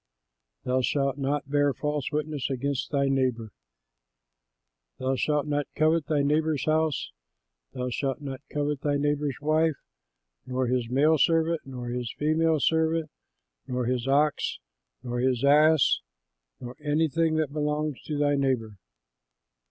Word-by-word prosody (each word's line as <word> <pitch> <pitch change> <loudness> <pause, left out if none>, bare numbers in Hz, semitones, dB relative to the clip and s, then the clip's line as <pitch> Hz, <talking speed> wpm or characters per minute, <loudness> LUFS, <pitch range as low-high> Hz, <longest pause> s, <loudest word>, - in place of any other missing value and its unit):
"THOU 130 +1 +1
SHALT 135 +1 0
NOT 140 +1 -1
BEAR 145 -1 +2
FALSE 150 -2 -2
WITNESS 150 -2 -2
AGAINST 135 +1 -2
THY 140 -1 +1
NEIGHBOR. 125 -5 0 1.5
"THOU 130 +1 -1
SHALT 150 +3 0
NOT 145 -1 -1
COVET 155 -1 +2
THY 150 -2 +1
NEIGHBOR'S 155 0 +1
HOUSE; 155 -1 0 0.6
thou 125 0 -3
shalt 135 +1 -2
not 135 -2 -6
covet 145 -1 -1
thy 145 -1 +1
neighbor's 145 -1 -1
wife, 155 +1 +2 0.7
nor 130 0 -1
his 125 -1 -1
male 150 +5 +3
servant, 165 +1 +2
nor 125 -2 -6
his 120 -2 -3
female 155 +1 +2
servant, 160 0 +1 0.6
nor 125 -1 -2
his 125 0 -1
ox, 145 +2 +1 0.5
nor 120 -1 -3
his 125 -1 +1
ass, 150 +1 +5 0.6
nor 125 +1 -8
anything 160 +2 +1
that 155 -3 -1
belongs 150 -1 -1
to 150 - -3
thy 145 0 +2
neighbor." 125 -7 -1
145 Hz, 135 wpm, -27 LUFS, 130-155 Hz, 1.5 s, ass